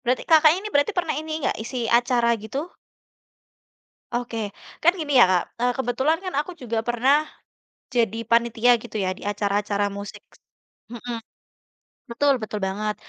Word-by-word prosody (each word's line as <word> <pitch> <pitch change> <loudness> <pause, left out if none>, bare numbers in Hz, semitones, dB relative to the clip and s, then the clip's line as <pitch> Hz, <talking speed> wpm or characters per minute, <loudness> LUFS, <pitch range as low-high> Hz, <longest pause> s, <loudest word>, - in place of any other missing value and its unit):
berarti 250 0 -1
Kakak 315 -1 +6
ini, 415 +3 -5
berarti 285 +9 +2
pernah 335 -3 0
ini 310 0 -4
gak, - - 0
isi 240 +1 -4
acara 240 -1 +3
gitu? 265 +8 -4 1.5
Oke, 240 -1 -3 0.5
kan 345 +2 +6
gini 290 -2 -3
ya - - +10
Kak, 180 -2 +3 0.2
eee, 245 0 +2
kebetulan 265 +6 +1
kan 365 - -4
aku 360 +5 -6
juga 230 -2 -2
pernah, 265 +6 +3 0.7
jadi 230 -2 +1
panitia, 235 +1 +3
gitu 240 - -8
ya, 185 - 0
di - - -15
acara-acara 205 0 0
musik 200 0 -8 0.7
mhm, 240 0 -5 0.9
betul 280 +4 +3
betul 210 -1 -4
banget. 210 +2 -2
240 Hz, 145 wpm, -24 LUFS, 220-290 Hz, 1.5 s, ya